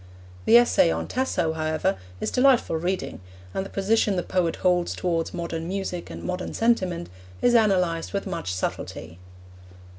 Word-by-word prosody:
The 235 - +8
essay 240 - +5
on 80 0 -2
Tasso, 180 -11 0
however, 155 -8 0 0.2
is - - -2
delightful 255 -8 +3
reading, 180 - -3 0.3
and 190 - -1
the 195 - -8
position 205 +1 +1
the 180 - -1
poet 175 -3 0
holds 180 -1 +1
towards 165 -2 -1
modern 165 -1 -4
music 190 -2 -4
and - - -8
modern 180 0 -4
sentiment 185 - +1 0.3
is 245 - +3
analysed 180 -7 +2
with 200 -1 -2
much 170 - -3
subtlety. 85 -2 -4
180 Hz, 150 wpm, -25 LUFS, 165-200 Hz, 0.3 s, The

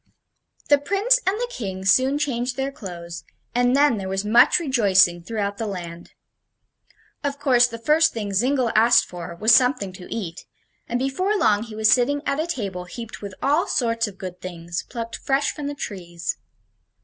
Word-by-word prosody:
The 290 -1 +6
Prince 400 - +2
and 400 +3 +1
the - - -1
King 190 - -5
soon 260 +8 +4
changed 250 -4 -2
their 270 +1 -2
clothes, 170 - -8 0.3
and 245 +1 +2
then 285 -4 +4
there 190 -1 -5
was 195 +1 -2
much 235 +4 +5
rejoicing 200 - +3
throughout 200 +2 -3
the 225 - -2
land. 175 -3 -7 1.1
Of 285 0 -2
course 255 -4 +4
the 230 -1 -7
first 310 +7 +3
thing 205 -3 -5
Zingle 250 +3 +1
asked 230 +3 +5
for 175 -1 -8
was 220 +6 +4
something 250 -6 +3
to 180 -1 -12
eat, 180 -6 -6 0.4
and 240 - 0
before 370 +11 0
long 210 - +3
he 225 -1 -8
was 215 0 +3
sitting 285 +4 +2
at 280 - -1
a 320 - -1
table 195 - -4
heaped 230 +5 -9
with 200 -2 -7
all 295 +5 +2
sorts 230 -2 0
of 195 -2 -10
good 180 -1 -8
things, 170 -1 -5
plucked 230 -1 -5
fresh 275 +1 0
from 295 -2 -5
the 290 - -4
trees. 175 -10 -5
230 Hz, 180 wpm, -23 LUFS, 190-275 Hz, 1.1 s, The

